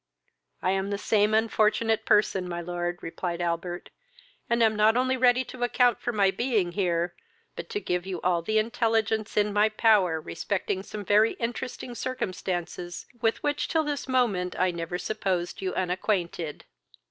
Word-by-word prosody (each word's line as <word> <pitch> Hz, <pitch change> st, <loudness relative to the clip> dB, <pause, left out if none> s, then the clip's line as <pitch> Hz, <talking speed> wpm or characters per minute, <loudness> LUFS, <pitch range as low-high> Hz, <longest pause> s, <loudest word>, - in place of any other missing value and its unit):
"I 185 Hz, -, +2 dB
am 195 Hz, +1 st, -1 dB
the 200 Hz, -, -1 dB
same 210 Hz, +1 st, +2 dB
unfortunate 220 Hz, 0 st, +2 dB
person, 195 Hz, -3 st, +3 dB
my 175 Hz, 0 st, -3 dB
lord, 175 Hz, 0 st, -3 dB
(replied 170 Hz, +1 st, -4 dB
Albert;) 175 Hz, +1 st, -3 dB, 0.6 s
and 235 Hz, 0 st, +3 dB
am 220 Hz, -1 st, +3 dB
not 215 Hz, +2 st, +4 dB
only 260 Hz, +1 st, +2 dB
ready 250 Hz, 0 st, +4 dB
to 250 Hz, 0 st, -10 dB
account 245 Hz, 0 st, +3 dB
for 240 Hz, -, -1 dB
my 200 Hz, -4 st, +3 dB
being 215 Hz, -5 st, 0 dB
here, 175 Hz, -2 st, 0 dB, 0.4 s
but -, -, -7 dB
to 430 Hz, -3 st, -2 dB
give 180 Hz, -, -2 dB
you 185 Hz, -3 st, -3 dB
all 175 Hz, -2 st, +1 dB
the 215 Hz, +6 st, 0 dB
intelligence 220 Hz, -1 st, 0 dB
in 210 Hz, 0 st, +2 dB
my 210 Hz, +1 st, +4 dB
power 210 Hz, -7 st, +3 dB
respecting 185 Hz, +4 st, -3 dB
some 205 Hz, +1 st, -7 dB
very 210 Hz, +3 st, +4 dB
interesting 245 Hz, +1 st, -4 dB
circumstances 180 Hz, -7 st, -4 dB, 0.2 s
with 225 Hz, -1 st, +1 dB
which 290 Hz, 0 st, 0 dB
till 320 Hz, -1 st, +1 dB
this 290 Hz, -3 st, -3 dB
moment 215 Hz, -9 st, +1 dB
I 185 Hz, 0 st, +2 dB
never 170 Hz, +1 st, -4 dB
supposed 190 Hz, -4 st, -2 dB
you 190 Hz, -1 st, -1 dB
unacquainted. 180 Hz, -3 st, -2 dB
205 Hz, 160 wpm, -27 LUFS, 180-225 Hz, 0.6 s, not